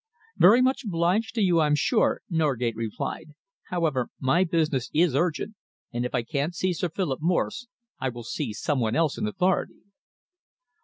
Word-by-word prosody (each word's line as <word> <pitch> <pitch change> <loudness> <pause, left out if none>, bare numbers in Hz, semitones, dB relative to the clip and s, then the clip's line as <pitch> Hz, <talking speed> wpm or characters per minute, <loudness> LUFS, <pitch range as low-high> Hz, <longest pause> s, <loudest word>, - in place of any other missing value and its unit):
"Very 225 +8 +7
much 265 +2 +1
obliged 190 +4 0
to 220 - +2
you, 175 -3 +3
I'm 150 -2 +3
sure," 220 +9 +1
Norgate 135 - 0
replied. 115 +6 -5 0.3
"However, 155 -8 -1
my 135 +7 +3
business 155 -7 0
is 165 -2 +4
urgent, 175 +7 0 0.4
and 120 +1 -1
if 125 - -5
I 120 - 0
can't 145 +7 -2
see 185 +2 0
Sir 175 +1 -2
Philip 160 -6 -2
Morse, 180 +8 0 0.3
I 130 - -1
will 120 -1 -8
see 120 -1 -3
some 135 +6 -1
one 115 -1 0
else 155 0 +1
in 210 - -1
authority." 190 -3 -1
160 Hz, 165 wpm, -26 LUFS, 130-180 Hz, 0.4 s, Very